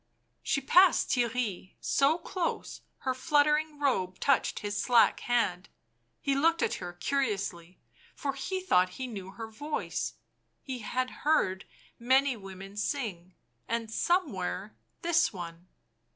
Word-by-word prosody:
She 275 - 0
passed 360 +6 +5
Theirry, 235 -6 -1
so 285 +4 +3
close, 355 0 -3 0.2
her 260 - 0
fluttering 300 +3 +2
robe 190 -11 0
touched 275 -2 +2
his 205 -1 -3
slack 245 -2 +4
hand; 200 -7 0 0.5
he 275 - 0
looked 325 +4 +3
at - - +1
her 175 -1 -5
curiously, 195 -6 -2 0.4
for 275 -1 -2
he 370 +8 -3
thought 185 - +3
he 260 - -3
knew 200 -6 -7
her 225 +3 -7
voice; 290 +8 -3 0.5
he 260 -2 -5
had 255 +3 -2
heard 195 -11 +2 0.3
many 260 +2 +3
women 195 -1 -10
sing, 205 - -3 0.3
and, 230 -1 -2
somewhere, 215 - -1 0.3
this 340 0 +3
one. 175 -2 -8
245 Hz, 125 wpm, -30 LUFS, 190-285 Hz, 0.5 s, passed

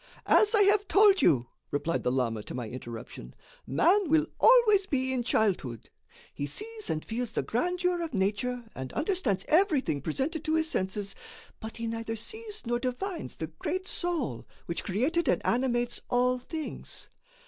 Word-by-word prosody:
"As 430 +1 +5
I 410 - +6
have 410 0 +3
told 395 -1 +6
you," 135 - +4 0.2
replied 160 +4 -1
the 125 - 0
lama 120 -4 0
to - - -7
my 120 -3 -4
interruption, 115 - -8 0.3
"man 350 - +3
will 315 0 +4
always 435 -5 +6
be 260 -4 0
in 255 - 0
childhood. 190 - 0 0.4
He 145 - -3
sees 435 - -5
and 155 - -2
feels 235 0 -3
the - - 0
grandeur 360 +7 0
of 330 - -3
nature 235 +4 -1
and 130 -1 -5
understands 295 - 0
everything 305 - +2
presented 275 - -2
to 315 - +1
his 320 0 +2
senses, 195 -5 -2 0.5
but 220 +1 -7
he 230 - -4
neither 225 0 -3
sees 430 - -6
nor 240 +1 0
divines 300 +9 -4
the 160 - -4
Great 370 +4 -2
Soul 330 - -2 0.2
which 170 - -3
created 275 - 0
and - - +3
animates 240 -1 +1
all 250 +1 +2
things. 315 +4 -6
250 Hz, 160 wpm, -29 LUFS, -, 0.5 s, I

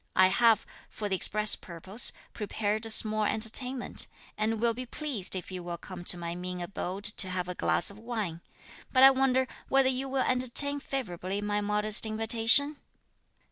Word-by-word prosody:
I 185 0 +5
have, 230 +2 +2 0.2
for 210 - -6
the 190 - 0
express 210 +3 +4
purpose, 190 +6 -1 0.2
prepared 215 +1 -3
a - - -7
small 215 0 +3
entertainment, 240 +4 0 0.3
and 220 +1 -2
will 235 0 +1
be 250 +2 -8
pleased 250 -11 -2
if 185 0 -6
you 185 -1 -6
will 175 0 -7
come 180 0 -10
to 180 - +5
my 170 -1 -6
mean 180 +1 -6
abode 185 +2 -6
to 210 -3 +3
have 180 -1 -4
a 180 - -5
glass 180 - +2
of 200 - -15
wine. 215 -8 -5 0.5
But 260 -1 +3
I 270 - +9
wonder 260 -1 0 0.2
whether 270 -1 +3
you 265 +1 -3
will 265 0 -1
entertain 255 +3 +2
favourably 200 -9 -5
my 205 0 -2
modest 210 +1 +2
invitation?" 225 +6 +3
215 Hz, 175 wpm, -28 LUFS, 185-250 Hz, 0.5 s, I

